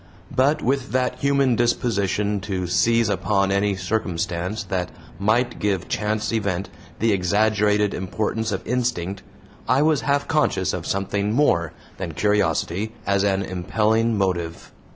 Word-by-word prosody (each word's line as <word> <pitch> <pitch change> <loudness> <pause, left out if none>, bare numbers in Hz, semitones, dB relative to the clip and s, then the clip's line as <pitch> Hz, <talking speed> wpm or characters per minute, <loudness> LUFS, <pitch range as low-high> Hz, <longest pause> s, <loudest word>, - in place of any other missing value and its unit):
But 140 +4 +2
with 135 0 -1
that 125 0 0
human 140 -2 +2
disposition 105 -4 0
to 95 -2 -3
seize 110 +7 +2
upon 100 0 +1
any 100 0 +1
circumstance 90 0 -2
that 90 -2 -2 0.3
might 115 +5 +1
give 100 -3 -1
chance 105 +1 -1
event 100 -4 -1 0.3
the 115 +1 +2
exaggerated 105 +2 +2
importance 110 +4 -2
of 95 - -3
instinct, 110 -6 -1 0.5
I 130 +3 +4
was 155 -2 +3
half 140 0 0
conscious 155 -2 +1
of - - -4
something 100 +1 -1
more 85 - +2 0.2
than 90 -4 -5
curiosity 105 +1 0
as 100 0 +2
an 100 -1 +1
impelling 110 +5 +1
motive. 85 -4 -2
105 Hz, 130 wpm, -23 LUFS, 95-115 Hz, 0.5 s, I